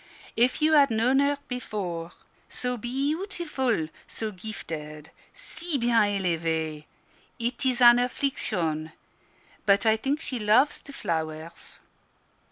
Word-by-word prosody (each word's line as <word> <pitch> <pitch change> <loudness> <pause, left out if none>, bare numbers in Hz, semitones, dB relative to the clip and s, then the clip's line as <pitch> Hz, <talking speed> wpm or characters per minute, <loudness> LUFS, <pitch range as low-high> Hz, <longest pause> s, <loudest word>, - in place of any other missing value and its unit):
If 250 +6 +2
you 315 +1 +4
had 285 -2 +6
known 235 +4 +2
her 285 0 +2
before! 185 -9 -4 0.4
so 250 0 -2
be 240 +1 -6 0.2
eautiful, 300 - -1 0.2
so 220 -1 -5
gifted, 160 -6 -7 0.2
si 325 -2 -3
bien 235 -2 +3 0.2
elevee! 160 -4 -1 0.5
It 240 +1 -3
is 255 -1 +1
an 240 0 +8
affliction: 175 - -1 0.7
but 200 +1 +4
I 220 0 +4
think 275 +6 -1
she 255 -6 -4
loves 220 +7 +3
the 285 - -12
flowers." 160 - -5
225 Hz, 120 wpm, -26 LUFS, 165-265 Hz, 0.7 s, an